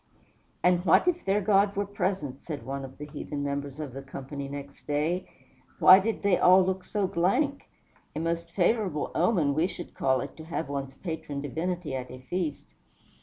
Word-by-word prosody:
"And 180 0 +4
what 180 - +5
if 350 -1 +1
their 200 +2 +2
God 200 0 +3
were 200 +1 0
present?" 185 -9 -2
said 150 -4 -6
one 135 +1 -4
of 135 0 -9
the 150 - -6
heathen 145 0 -5
members 140 0 -3
of 145 -5 -5
the 135 - -6
company, 140 +1 -7
next 140 0 -9
day. 155 +5 0 0.5
"Why 185 +1 +9
did 220 +3 -2
they 200 -3 +3
all 185 +1 +7
look 190 0 -1
so 205 +1 -1
blank? 250 - 0 0.5
A - - -2
most 170 +1 -2
favorable 185 -3 +1
omen, 170 -5 +2
we 160 +5 +2
should 175 - -8
call 130 -1 +1
it, - - -7
to 160 - -9
have 165 -2 -3
one's 135 -1 -4
patron 160 -5 -5
divinity 160 +3 -3
at 130 -1 -4
a 130 - -8
feast." 150 +3 -4
165 Hz, 185 wpm, -28 LUFS, 140-185 Hz, 0.5 s, Why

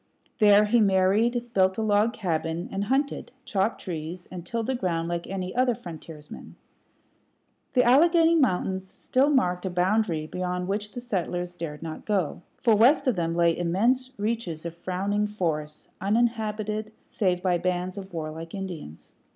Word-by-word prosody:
There 210 -1 +6
he 230 +2 +3
married, 215 +5 +2
built 190 0 +3
a 220 - 0
log 210 +1 +3
cabin, 170 -5 -2
and 195 +1 -2
hunted, 270 +4 -1
chopped 200 +2 0
trees, 170 0 -6
and 180 -2 -6
tilled 230 +5 -3
the 265 - 0
ground 170 -8 -1
like 170 0 -3
any 185 -1 -4
other 250 -1 +3
frontiersman. 160 -4 -10 1.2
The 250 - +4
Alleghany 330 +6 +5
Mountains 190 - +1
still 260 +8 +1
marked 180 -11 +2
a 190 - -1
boundary 180 -2 +1
beyond 180 +2 -3
which 205 +2 -3
the 245 - -5
settlers 180 -6 -2
dared 165 -3 -6
not 160 -1 -7
go; 195 -8 0 0.2
for 235 -4 +3
west 245 +8 +5
of 255 -4 +2
them 165 -2 -1
lay 170 -1 +3
immense 230 +10 +1
reaches 205 -7 -3
of 170 - -4
frowning 200 +4 -1
forest, 155 -7 -3
uninhabited 215 0 0
save 180 -4 0
by 180 -2 +2
bands 180 0 -1
of 195 -1 -8
warlike 165 +1 -6
Indians. 175 - -7
190 Hz, 155 wpm, -26 LUFS, 175-225 Hz, 1.2 s, There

